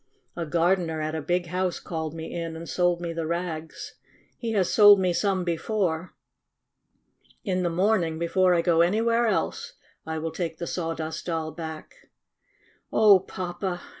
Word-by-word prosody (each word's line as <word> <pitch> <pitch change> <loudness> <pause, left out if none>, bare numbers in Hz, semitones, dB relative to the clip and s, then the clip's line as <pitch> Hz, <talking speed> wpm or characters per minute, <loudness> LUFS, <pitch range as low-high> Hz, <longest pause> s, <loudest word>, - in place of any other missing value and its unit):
A 170 -2 -4
gardener 170 0 +1
at 155 0 -2
a 160 - -2
big 175 +4 0
house 180 +1 -2
called 160 -2 -5
me 160 0 -6
in 165 -1 -4
and 165 +1 -8
sold 175 -1 +1
me 170 -1 -3
the 165 -1 -3
rags. 165 -2 -5 0.4
He 230 -2 -4
has 190 -4 +2
sold 205 -2 +8
me 180 -2 +1
some 190 0 0
before. 175 0 -2 1.3
In 185 -3 -1
the 175 - +1
morning, 175 -2 +1
be 170 - -1
fore 180 +1 +3
I 170 - +2
go 170 -2 +3
anywhere 230 +6 +2
else, 220 - -1 0.3
I 160 0 -4
will 160 +1 -3
take 165 -2 -4
the 170 - -4
Sawdust 165 -1 -4
Doll 160 -2 -2
back." 160 0 -9 0.8
"Oh, 210 -3 +6
Papa 180 0 -4
!" - - -16
175 Hz, 165 wpm, -26 LUFS, 160-185 Hz, 1.3 s, sold